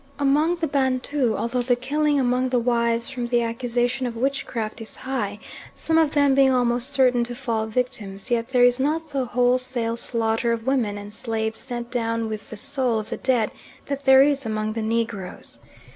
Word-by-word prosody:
Among 295 +4 +2
the 335 -2 -2
Bantu, 265 -3 0
although 240 +2 -1
the 245 0 +2
killing 290 +4 +1
among 255 0 +1
the 250 - +1
wives 235 -1 +1
from 245 -2 -3
the 240 0 +2
accusation 245 +2 -1
of 235 - -5
witchcraft 230 -3 -2
is 225 - -9
high, 235 -6 -3 0.4
some 325 0 +1
of 310 -2 +2
them 285 -2 +4
being 270 0 +5
almost 245 0 +1
certain 255 -3 +3
to 240 0 -5
fall 230 -4 -2
victims, 220 -3 -4
yet 230 0 0
there 250 -2 +3
is 245 +1 +4
not 310 +3 -1
the 270 -2 -1
wholesale 245 -1 0
slaughter 230 0 0
of 225 -1 -4
women 245 -6 0
and 205 0 -9
slaves 220 0 -2
sent 240 -2 -5
down 230 -2 -1
with 215 -1 -6
the 215 - -8
soul 260 -1 0
of 215 0 -5
the - - -2
dead 245 -5 +1 0.3
that 280 -1 -4
there 265 0 +8
is 280 -1 +1
among 215 -1 -2
the 225 - -3
Negroes. 220 -4 -3
245 Hz, 190 wpm, -23 LUFS, 230-265 Hz, 0.4 s, there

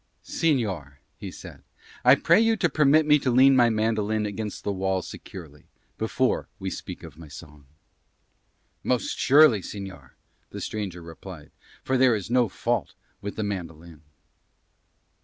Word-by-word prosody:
"Señor," 105 - -1 0.3
he - - -6
said, - - -11 0.4
"I 125 +2 +7
pray 170 +8 +4
you 225 0 +2
to 175 -4 +1
permit 150 +1 +4
me 150 0 +5
to 130 - -1
lean 130 +2 +6
my 120 -2 +5
mandolin 110 -1 0
against 105 0 -5
the 100 - -1
wall 95 -1 -1
securely 75 -6 -11 0.3
before - - 0
we - - -5
speak - - -8
of 80 -1 -12
my 80 - -11
song." 75 0 -13 1.2
"Most 125 -2 -1
surely, 135 -6 +6
señor," 95 -9 -9 0.4
the - - -8
stranger 95 -5 -5
replied, 85 -1 -11 0.3
"for 130 -1 0
there 130 -3 +5
is 105 +1 -5
no 125 -3 +3
fault 105 -4 -2 0.3
with 100 0 -6
the 110 - -2
mandolin." 85 -5 -6
105 Hz, 145 wpm, -25 LUFS, 85-130 Hz, 1.2 s, I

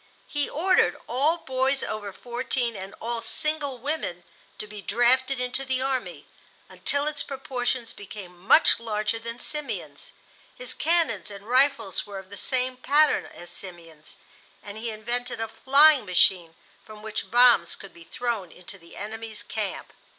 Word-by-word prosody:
He 290 -1 -1
ordered 365 +5 +3
all 290 +7 +2
boys 265 -2 0
over 205 -2 -4
fourteen 240 +1 -2
and 195 0 -7
all 235 0 -3
single 305 -3 -2
women 245 - -3 0.3
to - - -3
be 210 -1 -9
drafted 255 +5 +3
into 250 +2 -1
the 260 -1 -1
army, 260 -1 -2 0.4
until 285 0 -1
its 300 -1 -2
proportions 255 -3 -3
became 195 -3 -10
much 190 - +5
larger 215 -1 -1
than 230 +1 -6
Simeon's. 300 +3 -4 0.4
His - - -2
cannons 310 - +1
and 200 0 -10
rifles 250 -7 +2
were 200 -1 -7
of 190 0 -10
the - - -7
same 255 -1 0
pattern 295 +4 +3
as 175 0 -10
Simeon's, 165 -5 -9 0.5
and 205 0 -8
he 230 +1 -3
invented 235 +3 -3
a 225 - -1
flying 280 +4 +6
machine 175 -2 +3 0.3
from 215 -1 -12
which 215 0 -4
bombs 245 0 +5
could 195 - -12
be 170 - -14
thrown 225 -3 -3
into 180 +2 -10
the 170 -1 -15
enemy's 220 +1 -5
camp. - - -4
235 Hz, 150 wpm, -26 LUFS, 205-270 Hz, 0.5 s, flying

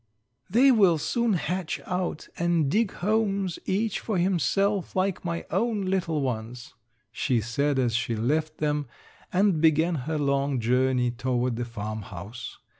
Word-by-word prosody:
"They 250 +8 +6
will 195 -8 +5
soon 235 - 0
hatch 180 -1 -2
out 180 -3 -3
and 170 -4 +2
dig 220 +1 +2
homes 200 -4 0
each 210 +2 0
for 215 -4 -2
himself 190 +2 +1
like 190 0 0
my 170 -1 -3
own 210 +1 0
little 175 -5 0
ones," 120 -2 -4 0.4
she 120 +1 0
said 135 +6 0
as 125 -3 +1
she 120 0 0
left 155 +8 0
them 150 -2 -1 0.4
and 185 -4 +2
began 160 +2 +4 0.2
her 160 - 0
long 140 -2 +1
journey 125 +1 +2
toward 125 0 -1
the 120 +1 -3
farmhouse. 110 -1 -7
155 Hz, 140 wpm, -26 LUFS, 125-190 Hz, 0.4 s, They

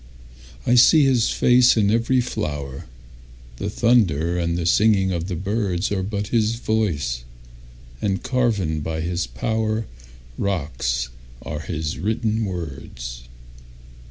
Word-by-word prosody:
I - - +3
see 145 +5 +7
his 125 -4 +3
face 125 -1 +4
in 100 -2 +3
every 115 +3 +2
flower; 75 - -4 0.7
The 100 - -3
thunder 95 - +2
and 85 -1 -1
the 85 - -2
singing 95 +1 +3
of 85 -1 -2
the 90 - -3
birdsAre 95 0 -1
but 100 +1 -3
his 115 -1 +1
voice—and - - -4
carven 105 -12 0
by 80 +1 -3
his 85 -2 -2
powerRocks 65 - -3 0.3
are 75 - -5
his 80 -1 -4
written 110 +3 0
words. 65 -9 -6
90 Hz, 110 wpm, -22 LUFS, 70-110 Hz, 0.7 s, see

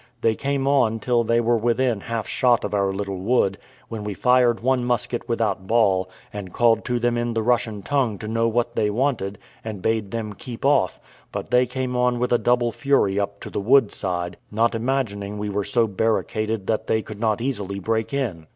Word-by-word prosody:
They 115 - +3
came 135 +3 -1
on 125 -6 +3
till 120 +1 +1
they 115 +1 +2
were 120 0 +2
within 120 0 +1
half 115 -1 -3
shot 120 -2 +2
of - - -3
our 100 -1 +1
little 100 -1 -4
wood, 100 -1 +1 0.3
when 110 -2 -6
we 105 -1 -4
fired 125 +1 +3
one 130 0 +2
musket 120 0 -2
without 105 -5 -1
ball, 95 -5 +2 0.2
and 100 -3 -6
called 115 0 +3
to 125 - 0
them 120 0 +1
in 120 -1 -2
the 110 - 0
Russian 110 -3 0
tongue 130 -6 0
to 105 - -7
know 115 +1 +1
what 120 +1 0
they 105 - +1
wanted, 110 -4 -1 0.3
and 110 -3 -5
bade 110 -3 0
them 110 -1 -4
keep 120 +5 -8
off; 115 -11 +2 0.3
but - - -5
they 125 0 +4
came 130 0 -3
on 125 0 +2
with 125 0 0
a 120 - +4
double 120 -1 +2
fury 110 -6 +1
up 100 0 -3
to - - -8
the - - -2
wood 120 +1 +4
side, 90 -2 -3
not 115 +3 +1
imagining 110 -4 -2
we 105 0 -3
were 100 +1 -1
so 115 +4 +2
barricaded 110 0 -1
that 110 +1 -1
they 110 -1 +1
could 105 -1 -9
not 110 -1 +1
easily 105 -6 -3
break 110 +3 -1
in. 110 - -3
115 Hz, 205 wpm, -23 LUFS, 105-120 Hz, 0.3 s, they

